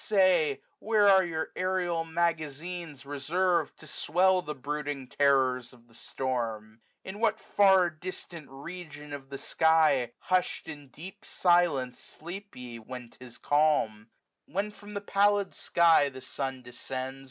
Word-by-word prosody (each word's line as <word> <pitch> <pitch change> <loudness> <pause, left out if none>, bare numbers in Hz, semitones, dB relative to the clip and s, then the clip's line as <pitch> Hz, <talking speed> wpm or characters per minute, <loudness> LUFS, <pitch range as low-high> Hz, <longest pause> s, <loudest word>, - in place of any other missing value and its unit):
say, 180 -8 +3 0.2
Where 205 -3 +5
your 160 -2 -3
aerial 180 -3 0
magazines 165 -1 -2
reservM, 160 +4 0
To - - -14
swell 185 +4 +2
the 150 -3 -6
brooding 145 0 -4
terrors 130 -3 +2
of 120 -1 -20
the 115 - -23
storm? 115 -4 -4 0.2
115 190 - -6
In - - -9
what 220 -1 +2
far 190 -3 +4
distant 170 -2 -8
region 150 0 -9
of 135 -1 -8
the 140 - -6
sky, 155 -6 +3
Hush'd 185 -1 -1
in 145 -3 -9
deep 165 +9 -11
silence, 170 -8 +2
sleep 195 +6 -9
ye 120 -2 -8
when 125 +1 -9
't - - -21
is 120 -2 -12
calm? 145 -8 +1 0.4
When 200 +2 -2
from 210 0 -12
the 205 - -2
pallid 205 0 +2
sky 165 -4 +4
the 130 -1 -10
sun 135 0 -4
descends. 130 +2 -5
155 Hz, 140 wpm, -29 LUFS, 135-180 Hz, 0.4 s, Where